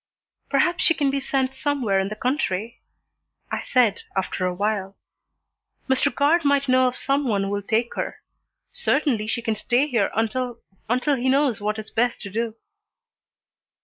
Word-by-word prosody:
"Perhaps 350 Hz, -1 st, +2 dB
she 330 Hz, -, +4 dB
can 280 Hz, -3 st, +1 dB
be 275 Hz, -, 0 dB
sent 265 Hz, -1 st, -1 dB
somewhere 265 Hz, -8 st, 0 dB
in 190 Hz, -, 0 dB
the 215 Hz, -, -5 dB
country," 235 Hz, -4 st, -2 dB, 0.7 s
I -, -, -1 dB
said, 235 Hz, -6 st, +2 dB
after 190 Hz, -1 st, -1 dB
a 180 Hz, -, -1 dB
while. 200 Hz, 0 st, -2 dB, 0.9 s
"Mr. 265 Hz, -1 st, +2 dB
Guard 295 Hz, +7 st, +3 dB
might 280 Hz, -1 st, +2 dB
know 255 Hz, 0 st, +4 dB
of 250 Hz, -, -2 dB
some 275 Hz, 0 st, 0 dB
one 200 Hz, -4 st, +1 dB
who 195 Hz, -, -2 dB
will 205 Hz, 0 st, -1 dB
take 225 Hz, +4 st, 0 dB
her. -, -, -4 dB, 0.6 s
Certainly 225 Hz, -8 st, +1 dB
she 235 Hz, +2 st, -2 dB
can 225 Hz, -1 st, 0 dB
stay 245 Hz, +5 st, +1 dB
here 235 Hz, -8 st, +1 dB
until 235 Hz, +2 st, -1 dB, 0.3 s
until 255 Hz, +4 st, +2 dB
he 255 Hz, +1 st, 0 dB
knows 270 Hz, -5 st, +2 dB
what 210 Hz, +1 st, -1 dB
is 220 Hz, 0 st, -8 dB
best 240 Hz, +1 st, +1 dB
to 200 Hz, -, -7 dB
do." 225 Hz, +1 st, -2 dB
240 Hz, 170 wpm, -23 LUFS, 215-275 Hz, 0.9 s, she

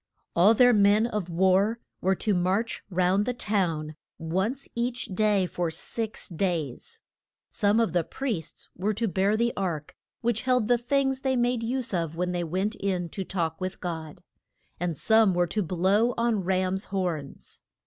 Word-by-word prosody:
All 200 Hz, +7 st, +6 dB
their 245 Hz, +1 st, +6 dB
men 205 Hz, +1 st, +4 dB
of 210 Hz, -6 st, -3 dB
war 190 Hz, +6 st, +2 dB, 0.2 s
were 190 Hz, +1 st, +2 dB
to 210 Hz, +3 st, 0 dB
march 190 Hz, +5 st, 0 dB
round 185 Hz, +3 st, +2 dB
the 250 Hz, -, -1 dB
town 170 Hz, -9 st, -1 dB, 0.2 s
once 190 Hz, +12 st, -2 dB
each 240 Hz, +1 st, -2 dB
day 205 Hz, -1 st, +2 dB
for 175 Hz, -1 st, -2 dB
six 220 Hz, +7 st, -5 dB
days. 170 Hz, -7 st, -3 dB, 0.5 s
Some 205 Hz, +2 st, +2 dB
of 230 Hz, -, +1 dB
the 175 Hz, -2 st, +2 dB
priests 220 Hz, -, -5 dB
were 205 Hz, +4 st, -1 dB
to 230 Hz, +2 st, 0 dB
bear 195 Hz, +3 st, +1 dB
the 235 Hz, +1 st, +1 dB
ark, 170 Hz, -6 st, -3 dB, 0.3 s
which 230 Hz, -2 st, 0 dB
held 250 Hz, -4 st, +2 dB
the 245 Hz, 0 st, +3 dB
things 270 Hz, +1 st, 0 dB
they 265 Hz, -1 st, +1 dB
made 245 Hz, -1 st, +1 dB
use 250 Hz, 0 st, -2 dB
of 165 Hz, -3 st, -1 dB
when 180 Hz, +1 st, -1 dB
they 175 Hz, -1 st, -1 dB
went 190 Hz, +6 st, -1 dB
in 185 Hz, -5 st, -2 dB
to 195 Hz, -, -4 dB
talk 170 Hz, -3 st, -3 dB
with 185 Hz, 0 st, -4 dB
God, 160 Hz, -4 st, -6 dB, 0.6 s
and 170 Hz, -3 st, -2 dB
some 220 Hz, -1 st, +4 dB
were 175 Hz, 0 st, +3 dB
to 210 Hz, +5 st, -1 dB
blow 195 Hz, +7 st, +2 dB
on 230 Hz, -4 st, +1 dB
rams' 185 Hz, +1 st, 0 dB
horns. 175 Hz, -7 st, -4 dB
195 Hz, 170 wpm, -27 LUFS, 175-230 Hz, 0.6 s, All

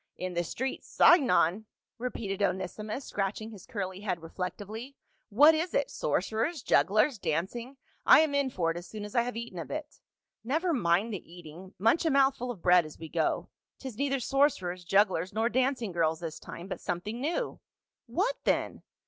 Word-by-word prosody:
" -, -, -45 dB
In 185 Hz, -, -4 dB
the 175 Hz, 0 st, 0 dB
street 260 Hz, +10 st, -3 dB
Singon 220 Hz, -, +4 dB, 0.2 s
!" -, -, -64 dB
repeated 210 Hz, -5 st, -4 dB
Onesimus, 205 Hz, +6 st, -2 dB
scratch 195 Hz, 0 st, -2 dB
ing 220 Hz, +1 st, -7 dB
his 205 Hz, -4 st, -12 dB
curly 195 Hz, -6 st, -4 dB
head 185 Hz, -5 st, -3 dB
reflectively. 205 Hz, +9 st, -6 dB, 0.2 s
" -, -, -44 dB
What 300 Hz, +2 st, +9 dB
is 335 Hz, +7 st, -1 dB
it, -, -, +1 dB
sorcerers, 240 Hz, +7 st, -1 dB
jugglers, 215 Hz, +5 st, +3 dB
dancing? 195 Hz, -, -3 dB, 0.3 s
I -, -, +8 dB
am 310 Hz, -2 st, +1 dB
in 280 Hz, -1 st, +2 dB
for 170 Hz, -8 st, 0 dB
it 165 Hz, -, -5 dB
as 175 Hz, 0 st, -8 dB
soon 210 Hz, +2 st, -7 dB
as 210 Hz, -, -9 dB
I 235 Hz, -, +4 dB
have 245 Hz, 0 st, -4 dB
eaten 230 Hz, -6 st, -6 dB
a 165 Hz, -, -4 dB
bit." 305 Hz, -1 st, -6 dB, 0.2 s
" -, -, -62 dB
Never 335 Hz, +2 st, +1 dB
mind 195 Hz, -, +1 dB
the 180 Hz, -3 st, -7 dB
eating, 175 Hz, +2 st, -12 dB
munch 225 Hz, -, +3 dB
a 325 Hz, -, +2 dB
mouthful 270 Hz, -3 st, +2 dB
of 215 Hz, -8 st, -6 dB
bread 180 Hz, -1 st, +6 dB
as 155 Hz, -1 st, -11 dB
we 160 Hz, -1 st, -9 dB
go; -, -, -1 dB, 0.3 s
'tis 260 Hz, -5 st, -7 dB
neither 275 Hz, +2 st, 0 dB
sorcerers, 235 Hz, -11 st, +1 dB
jugglers, 190 Hz, -1 st, +2 dB
nor 225 Hz, +2 st, +1 dB
dancing 255 Hz, -4 st, 0 dB
girls 160 Hz, -2 st, +1 dB
this 165 Hz, -2 st, -6 dB
time, 175 Hz, -, -9 dB
but -, -, -6 dB
something 210 Hz, +7 st, -4 dB
new." 345 Hz, -, -2 dB, 0.5 s
"What 395 Hz, -, 0 dB
then?" -, -, 0 dB
215 Hz, 190 wpm, -29 LUFS, 180-265 Hz, 0.5 s, What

